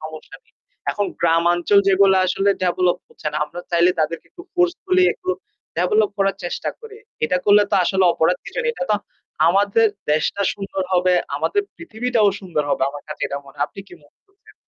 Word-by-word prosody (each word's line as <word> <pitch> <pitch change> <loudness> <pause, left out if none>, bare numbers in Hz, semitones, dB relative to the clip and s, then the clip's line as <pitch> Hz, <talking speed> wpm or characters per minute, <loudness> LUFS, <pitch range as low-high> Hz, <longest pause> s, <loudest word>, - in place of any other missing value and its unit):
সমস্যা 155 0 -9
নেই। 470 - -34 0.4
এখন 205 -1 -1
গ্রামাঞ্চল 170 +3 +3
যেগুলা 190 0 +5
আসলে 195 +2 +1
ডেভেলপ 180 0 +2
হচ্ছে - - -11
না, - - -3
আমরা 155 +4 -9
চাইলে 170 +1 +4
তাদেরকে 160 +2 -2
একটু 350 - -12
ফোর্সফুলি 365 +1 +2
একটু 370 - -5 0.5
ডেভেলপ 215 -1 +2
করার 195 -1 +1
চেষ্টা 175 - -3
করি। 445 -2 -12 0.3
এটা 180 - +1
করলে 205 0 +6
তো - - +2
আসলে 190 +1 +2
অপরাধ 165 +3 +2
কিছু - - -7
নেই। 475 - +1
এটা 265 - -4
তো 210 - +4 0.5
আমাদের 200 +5 +3 0.3
দেশটা 155 +6 0
সুন্দর 195 -1 -4
হবে, 180 0 +3 0.2
আমাদের 410 - 0
পৃথিবীটাও 240 -7 0
সুন্দর 175 -6 -2
হবে। 140 - 0
আমার 145 0 -9
কাছে 150 - -7
এটা 140 - -4
মনে 135 - -16
হয়। 145 - 0
আপনি - - -10
কি - - -12
মনে 145 - -26
করছেন? 390 0 -23
195 Hz, 185 wpm, -21 LUFS, 170-220 Hz, 0.5 s, করলে